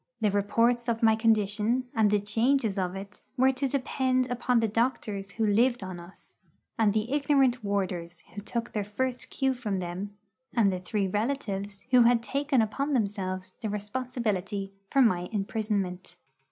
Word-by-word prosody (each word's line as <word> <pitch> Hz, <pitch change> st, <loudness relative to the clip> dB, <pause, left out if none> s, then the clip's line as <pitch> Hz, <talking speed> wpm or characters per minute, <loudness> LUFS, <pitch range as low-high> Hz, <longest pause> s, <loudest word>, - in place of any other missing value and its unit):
The 210 Hz, -2 st, +2 dB
reports 230 Hz, +4 st, +2 dB
of 230 Hz, 0 st, -1 dB
my 220 Hz, -1 st, +6 dB
condition, 220 Hz, +2 st, +2 dB
and 220 Hz, -2 st, +3 dB
the 210 Hz, 0 st, +3 dB
changes 225 Hz, +1 st, +1 dB
of 180 Hz, 0 st, -2 dB
it, 195 Hz, +1 st, -8 dB, 0.2 s
were 260 Hz, +1 st, +5 dB
to 265 Hz, +1 st, -1 dB
depend 255 Hz, -1 st, 0 dB
upon 245 Hz, 0 st, +2 dB
the 225 Hz, -, +2 dB
doctors 210 Hz, -4 st, -1 dB
who 225 Hz, -, 0 dB
lived 235 Hz, +2 st, +3 dB
on 185 Hz, -2 st, -6 dB
us, 175 Hz, +2 st, -14 dB, 0.5 s
and 215 Hz, -2 st, +4 dB
the 215 Hz, +4 st, -1 dB
ignorant 275 Hz, -4 st, +2 dB
warders 180 Hz, -4 st, -2 dB
who 205 Hz, -, -6 dB
took 235 Hz, +3 st, -4 dB
their 210 Hz, -, -1 dB
first 250 Hz, +5 st, -3 dB
cue 265 Hz, -1 st, 0 dB
from 220 Hz, -6 st, -3 dB
them, 185 Hz, +3 st, -5 dB, 0.4 s
and 205 Hz, -5 st, +4 dB
the 185 Hz, -, -3 dB
three 195 Hz, +2 st, -1 dB
relatives 205 Hz, -3 st, -3 dB
who 250 Hz, -1 st, +7 dB
had 235 Hz, 0 st, +4 dB
taken 275 Hz, -1 st, +1 dB
upon 275 Hz, +7 st, -2 dB
themselves 190 Hz, -5 st, -2 dB
the 220 Hz, -, -2 dB
responsibility 210 Hz, -3 st, -3 dB, 0.2 s
for 275 Hz, -, +4 dB
my 180 Hz, -6 st, +1 dB
imprisonment. 200 Hz, -3 st, -2 dB
215 Hz, 165 wpm, -28 LUFS, 200-245 Hz, 0.5 s, who